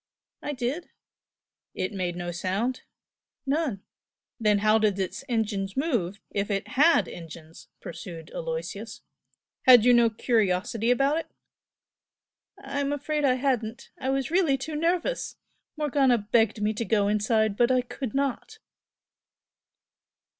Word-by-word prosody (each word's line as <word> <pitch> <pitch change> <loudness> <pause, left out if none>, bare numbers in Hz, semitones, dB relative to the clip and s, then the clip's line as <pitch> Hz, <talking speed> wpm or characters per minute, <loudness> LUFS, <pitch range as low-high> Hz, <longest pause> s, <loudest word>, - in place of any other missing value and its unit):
"I 295 - -3
did." 265 +6 -3 0.9
"It 185 - -2
made 180 -3 -2
no 175 0 -4
sound?" 195 +9 -2 0.6
"None." 275 -8 -1 0.6
"Then 210 -2 +3
how 215 +2 +3
did 210 -3 +2
its 190 -2 -3
engines 210 -3 -1
move, 225 - -1
if 200 +1 -2
it 200 0 -2
HAD 285 - +4
engines?" 165 -1 -11
pursued 170 -2 -9
Aloysius - - -5 0.7
"Had 245 -3 +9
you 250 - +7
no 235 -1 +5
curiosity 220 -1 0
about 275 +5 +3
it?" 325 - -7 1.3
"I'm 280 +1 -3
afraid 295 +1 -2
I 255 -2 +4
hadn't 245 -4 -2
I 265 - -2
was 270 +1 -1
really 335 -6 +3
too 300 +4 -5
nervous! 345 +9 -1 0.4
Morgana 280 -4 +3
begged 215 0 +1
me 215 +1 +1
to 220 - -3
go 210 -3 +2
inside, 215 0 +1
but 240 +3 +3
I 255 -1 +3
could 250 -1 -6
not!" 280 - -2
235 Hz, 130 wpm, -26 LUFS, 205-275 Hz, 1.3 s, Had